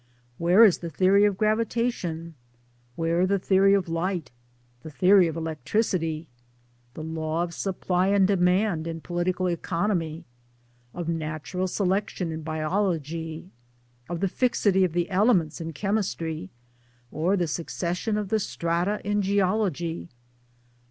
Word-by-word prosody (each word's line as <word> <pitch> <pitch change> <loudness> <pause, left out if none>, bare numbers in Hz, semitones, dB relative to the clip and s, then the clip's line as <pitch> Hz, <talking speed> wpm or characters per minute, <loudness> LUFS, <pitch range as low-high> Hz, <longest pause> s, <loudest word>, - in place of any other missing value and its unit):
where 180 +7 +6
is 195 - +4
the 170 - -5
theory 190 +5 +4
of 205 -2 +1
gravitation, 215 -6 -1 0.6
where 165 +4 +1
the 200 +1 +2
theory 195 +1 +4
of 195 -3 0
light, 165 -3 -2 0.5
the 160 - -8
theory 185 +4 +5
of 160 - -4
electricity? 165 0 -1 0.7
the 155 - -6
law 160 +1 -2
of 170 -1 -5
supply 185 0 -1
and 195 -1 +4
demand 180 -2 +2
in 165 0 -4
Political 175 +2 -1
Economy, 170 -1 -2 0.7
of 175 +2 -5
Natural 165 +3 -3
Selection 190 -2 -1
in 160 0 -5
Biology? 160 0 -2 0.6
of 175 -1 -4
the 195 - +2
fixity 205 -3 +2
of 180 -3 0
the 175 0 0
Elements 185 -5 +2
in 165 0 -4
Chemistry, 165 - -2 0.6
or 175 +6 +1
the 175 - +1
succession 180 +6 -2
of 210 -2 -3
the 220 - +2
strata 175 +2 -1
in 205 +1 0
Geology? 190 -4 0
180 Hz, 130 wpm, -26 LUFS, 165-195 Hz, 0.7 s, where